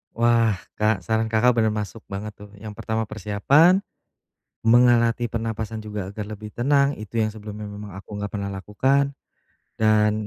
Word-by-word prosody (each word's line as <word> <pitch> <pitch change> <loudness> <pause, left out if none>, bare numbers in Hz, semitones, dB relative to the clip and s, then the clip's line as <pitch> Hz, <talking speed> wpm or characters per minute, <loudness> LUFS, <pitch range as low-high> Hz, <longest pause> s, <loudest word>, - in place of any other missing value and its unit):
Wah, 115 -2 +3 0.2
Kak, 105 -3 +2
saran 110 +1 0
Kakak 110 +3 +4
bener 110 -1 +2
masuk 105 +1 -5
banget, 100 +2 -5
tuh, 105 0 -12
yang 105 +1 -8
pertama 110 0 -2
persiapan, 110 - +3 0.8
melatih 120 0 +4
pernapasan 115 -1 -3
juga 105 -3 -5
agar 105 +1 -6
lebih 105 0 -8
tenang, 140 +3 +2
itu 110 +2 -3
yang 110 - +1
sebelumnya 105 0 -8
memang 105 -2 -8
aku 100 +2 -9
gak 100 0 -4
pernah 100 -1 -3
lakukan, 130 +9 +1 0.7
dan 105 -1 +4
110 Hz, 150 wpm, -23 LUFS, 105-115 Hz, 0.8 s, Kakak